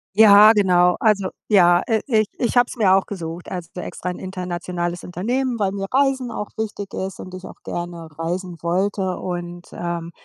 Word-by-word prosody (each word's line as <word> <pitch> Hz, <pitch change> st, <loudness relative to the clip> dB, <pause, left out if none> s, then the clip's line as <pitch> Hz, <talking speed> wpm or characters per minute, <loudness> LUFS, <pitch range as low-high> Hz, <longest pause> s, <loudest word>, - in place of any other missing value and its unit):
Ja, 210 Hz, 0 st, +8 dB
genau. 180 Hz, -3 st, +4 dB
Also, 200 Hz, -4 st, +2 dB, 0.2 s
ja, 175 Hz, -4 st, +5 dB
äh, 220 Hz, -2 st, +1 dB
i 220 Hz, -4 st, +3 dB
ich 245 Hz, -, -1 dB
habe 245 Hz, 0 st, +6 dB
es -, -, -8 dB
mir 200 Hz, -5 st, +4 dB
auch 195 Hz, -, 0 dB
gesucht. 170 Hz, -3 st, -6 dB
Also 175 Hz, -2 st, -6 dB
extra 180 Hz, -, -6 dB
'n 180 Hz, -, -6 dB
internationales 180 Hz, -1 st, -4 dB
Unternehmen, 240 Hz, +8 st, -2 dB
weil 195 Hz, -2 st, +2 dB
mir 195 Hz, 0 st, -4 dB
Reisen 265 Hz, -2 st, +1 dB
auch 210 Hz, -, -4 dB
wichtig 205 Hz, -2 st, -5 dB
ist 190 Hz, 0 st, -4 dB
und 185 Hz, -, -9 dB
ich 185 Hz, 0 st, -9 dB
auch -, -, -11 dB
gerne 175 Hz, -1 st, -6 dB
reisen 175 Hz, +2 st, -3 dB
wollte. 185 Hz, +2 st, -1 dB
Und, 175 Hz, -1 st, -6 dB
ähm, 170 Hz, -1 st, -4 dB
185 Hz, 180 wpm, -21 LUFS, 175-210 Hz, 0.2 s, Ja